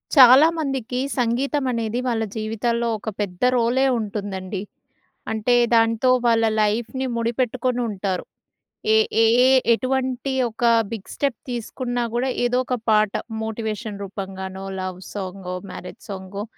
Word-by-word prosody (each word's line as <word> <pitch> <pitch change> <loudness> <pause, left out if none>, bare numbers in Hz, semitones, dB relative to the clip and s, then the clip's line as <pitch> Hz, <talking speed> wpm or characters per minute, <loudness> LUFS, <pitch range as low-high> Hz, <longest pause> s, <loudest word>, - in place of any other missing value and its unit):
చాలా 265 +3 +9
మందికి 265 -5 -2 0.2
సంగీతమనేది 245 -1 0
వాళ్ళ 230 -2 0
జీవితాల్లో, 230 +2 -1
ఒక 215 +1 -5
పెద్ద 180 -3 -4
రోలే 245 +3 +2
ఉంటుందండి. 200 -2 -4 0.7
అంటే, 220 +3 +2 0.2
దాంతో 230 +2 +3 0.2
వాళ్ళ 230 -1 +4 0.2
లైఫ్‌ని 235 +5 0
ముడిపెట్టుకొనుంటారు. 235 -4 -1 0.7
ఏ - - +6 0.3
ఏ - - +6 0.5
ఎటువంటి 260 +1 -1 0.2
ఒక 230 +2 -5 0.3
బిగ్ 215 -4 -6
స్టెప్ 280 -4 -1
తీసుకున్నా 245 +1 -3
కూడా, 255 +2 0 0.2
ఏదో 245 +1 +1
ఒక 250 - 0
పాట 215 -1 +3 0.3
మోటివేషన్ 220 -1 -4
రూపం 195 0 -6
గానో, 190 0 -6 0.2
లవ్ 185 -1 -5
సాంగో, 185 -2 -5 0.2
మ్యారేజ్ - - -9
సాంగో 195 +1 -6
230 Hz, 115 wpm, -22 LUFS, 205-250 Hz, 0.7 s, చాలా